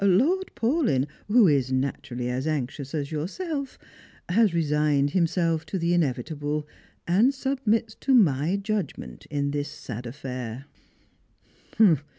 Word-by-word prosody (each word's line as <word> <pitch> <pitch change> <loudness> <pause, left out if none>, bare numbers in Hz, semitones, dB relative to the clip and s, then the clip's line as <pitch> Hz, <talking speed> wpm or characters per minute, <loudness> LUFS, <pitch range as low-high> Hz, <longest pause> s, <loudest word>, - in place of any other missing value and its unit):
Lord 275 - +3
Paulyn, 230 - +1 0.2
who 215 0 +6
is 135 -4 +2
na, 130 +1 +1
turally 125 -3 -5
as 130 +4 -2
anxious 140 -1 -3
as 145 -1 -3
yourself, 275 - -4 0.5
has 210 +2 +4
resigned 150 -3 +2
himself 165 -2 +1
to 195 - -2
the 170 0 +1
inevitable, 150 0 -1 0.4
and 205 +10 +4
submits 235 -5 0
to 270 -1 +3
my 165 - +3
judgment 200 - -4
in 140 -1 -1
this 145 0 -2
sad 125 -3 -7
affair." 125 -1 -6
155 Hz, 125 wpm, -26 LUFS, 140-205 Hz, 0.5 s, who